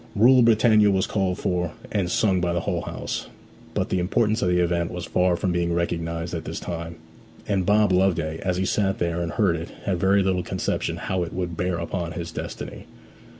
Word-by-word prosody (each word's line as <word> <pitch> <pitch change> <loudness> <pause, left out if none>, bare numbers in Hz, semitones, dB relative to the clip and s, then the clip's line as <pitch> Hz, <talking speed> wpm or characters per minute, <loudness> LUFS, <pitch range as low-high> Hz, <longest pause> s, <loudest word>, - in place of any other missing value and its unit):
'Rule 125 +5 +6
Britannia' 110 -2 +5
was 95 -1 +2
called 95 -3 -1
for 90 -2 -1 0.2
and 100 -4 0
sung 95 -1 +2
by 85 0 0
the 85 - 0
whole - - -1
house. - - -5 0.5
But - - 0
the 95 - +1
importance 110 +4 +1
of 90 - +2
the 90 - +2
event 85 -1 +1
was 90 -1 -5
far 90 -1 +2
from 90 +1 -1
being 85 -1 0
recognized 85 -1 -2
at 80 -2 -3
this - - -5
time; 85 -1 -5 0.5
and 95 -3 0
Bob 105 -1 +4
Loveday, 85 -4 +1
as 90 -2 -1
he 95 - 0
sat 95 0 +1
there 85 0 -1
and 85 -1 -3
heard 100 -6 +2
it, 85 0 -5
had 95 -4 -1
very 95 +2 +3
little 95 -1 +1
conception 85 - -2
how 95 -1 -2
it 85 -1 -4
would 90 -2 -3
bear 90 +1 -1
upon 85 0 -3
his 85 -1 -5
destiny. - - -7
90 Hz, 205 wpm, -24 LUFS, 85-95 Hz, 0.5 s, Rule